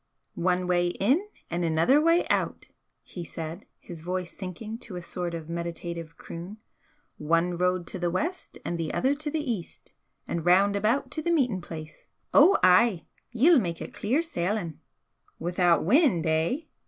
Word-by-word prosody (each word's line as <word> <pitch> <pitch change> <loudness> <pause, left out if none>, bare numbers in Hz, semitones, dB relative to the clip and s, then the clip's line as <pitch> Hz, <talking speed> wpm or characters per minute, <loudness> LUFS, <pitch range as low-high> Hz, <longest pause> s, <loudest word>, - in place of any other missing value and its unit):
"One 180 +1 0
way 175 -1 +2
in 260 - +1 0.2
and 175 +1 -1
another 165 - +4
way 330 +2 +3
out!" - - -1 0.3
he 175 - -8
said, 165 0 -7
his 170 -3 -10
voice 180 +1 -4
sinking 210 +4 -6
to 230 -6 -9
a 175 - -5
sort 175 0 -4
of 160 -2 -7
meditative 170 -1 -5
croon 175 +6 -8 0.6
"One 165 +3 +1
road 180 0 0
to 185 - -6
the 175 0 0
West, 320 - -3
and 170 - -2
the 160 -2 -2
other 265 +2 +2
to 300 +1 -4
the 295 -4 -1
East! 185 -7 -7 0.3
and 170 - -2
round 195 +4 +4
about 215 +7 +1
to 315 - -3
the 340 - -2
meeting 255 - +1
place! 155 -2 -9 0.3
Ou 395 - +7
ay! 185 0 +5 0.3
Ye'll 275 +7 +5
mak 170 -6 -3
it - - -7
clear 260 +10 0
sailin'!" 180 - -2 0.6
"Without 175 -1 +2
wind, 235 - +4
eh?" 160 - +1
180 Hz, 165 wpm, -27 LUFS, 170-240 Hz, 0.6 s, Ou